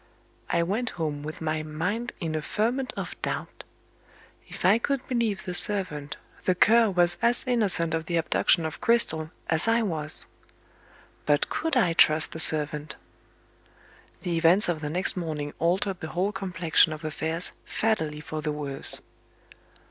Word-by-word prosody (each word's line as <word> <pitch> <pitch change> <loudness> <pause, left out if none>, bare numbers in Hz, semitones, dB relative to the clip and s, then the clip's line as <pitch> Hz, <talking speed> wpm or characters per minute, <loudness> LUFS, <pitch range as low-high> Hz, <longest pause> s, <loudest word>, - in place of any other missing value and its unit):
I 170 - +1
went 220 +7 -2
home 150 -3 -3
with 155 +2 -8
my 155 -1 -2
mind 180 +11 -3
in 165 -5 -3
a 155 - -2
ferment 240 - -2
of - - -5
doubt. - - -5 0.8
If - - -7
I 200 +5 +5
could 275 +1 -2
believe 230 -6 -1
the 180 - -4
servant, 170 -8 +1 0.3
the 185 - +2
Cur 225 +4 +4
was 175 -2 +1
as 235 +1 +2
innocent 205 -10 +1
of 160 -1 -3
the 175 - -2
abduction 165 0 +1
of 155 - -6
Cristel 160 -10 +2 0.2
as 160 +6 0
I 230 +1 +2
was. 155 -6 -1 1.0
But 145 -1 +2
could 315 -2 -1
I 180 -9 +2
trust 155 -1 +4
the 160 - -7
servant? 150 -2 +6 1.3
The 170 -2 -1
events 175 +5 +4
of 170 -3 -2
the 150 - -4
next 180 +5 +2
morning 155 -5 -4
altered 185 +3 0
the 160 - -6
whole 195 +3 +1
complexion 180 -5 +1
of 155 +1 -9
affairs 160 +2 -1
fatally 160 -9 -2
for 155 +1 -6
the 150 0 -2
worse. 145 -2 -4
170 Hz, 155 wpm, -26 LUFS, 155-210 Hz, 1.3 s, servant